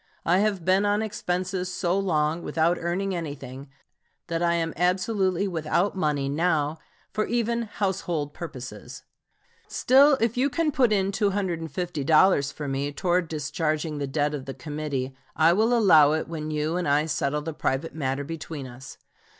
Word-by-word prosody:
I 180 +3 +4
have 200 -5 0
been 190 +2 +4
on 205 +1 +1
expenses 185 -2 -2
so 180 -1 0
long 160 -3 0
without 165 +2 +1
earning 185 +3 -1
anything 140 -5 -6 0.6
that 165 0 -1
I 170 0 +2
am 165 -1 -1
absolutely 185 +1 +1
without 175 +3 0
money 150 -6 0
now 155 0 0 0.3
for 215 - 0
even 235 0 0
household 180 -8 -2
purposes. 130 -7 -8 0.6
Still, 275 +2 +5
if 230 0 +1
you 270 +3 +2
can 310 +3 0
put 255 -5 +3
in 195 -2 +2
$250 175 -6 +1
for 150 - -6
me 140 +1 -2
towards 175 +3 0
discharging 155 0 -2
the 140 - -2
debt 145 +2 0
of 140 -3 -5
the 135 - -6
committee, 145 -4 -4 0.2
I 160 +2 +5
will 220 +5 +2
allow 165 -11 +6
it 160 - -1
when 155 -2 -5
you 155 +2 -1
and 180 - -1
I 145 +2 +3
settle 150 -1 -1
the 160 +1 -4
private 145 +1 -2
matter 140 -2 -2
between 155 -2 -6
us. 130 +1 -11
165 Hz, 160 wpm, -26 LUFS, 150-190 Hz, 0.6 s, allow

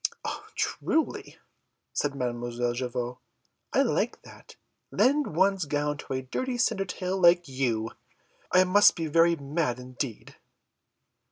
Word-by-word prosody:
"Truly," 320 -1 -1 0.6
said 145 -1 -1
Mademoiselle 120 -1 -2
Javotte, 125 0 -4 0.5
"I - - +4
like - - -1
that! - - -15 0.3
Lend 260 - +2
one's 190 0 +3
gown 145 0 -1
to - - -6
a 130 0 -2
dirty 250 - -3
Cindertail 195 -5 -1
like 175 -1 +5
you! 120 -4 -1 0.6
I 185 - +6
must 200 +3 +6
be 165 - -3
very 165 +2 +4
mad 145 -3 -2
indeed!" 125 -2 -6
150 Hz, 115 wpm, -27 LUFS, 125-185 Hz, 0.6 s, I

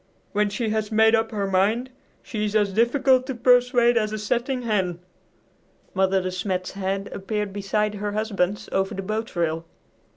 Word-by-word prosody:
When 210 0 +1
she 220 +2 -2
has 215 0 -1
made 220 +1 +5
up 225 0 +2
her 205 -2 -2
mind 205 +7 +1 0.3
she 215 -3 -4
is 210 0 -3
as 205 -2 +2
difficult 255 +3 +3
to 265 - -3
persuade 245 0 +4
as 215 -2 +1
a 215 - -3
setting 245 +4 -1
hen." 190 -6 0 1.0
Mother 190 0 +2
De 185 - -2
Smet's 185 0 -2
head 195 0 -3
appeared 205 0 -3
beside 205 +1 -1
her 205 0 -4
husband's 205 -2 -1
over 195 0 0
the 195 - -4
boat 215 +3 -4
rail. 165 -1 0
210 Hz, 170 wpm, -24 LUFS, 195-230 Hz, 1.0 s, made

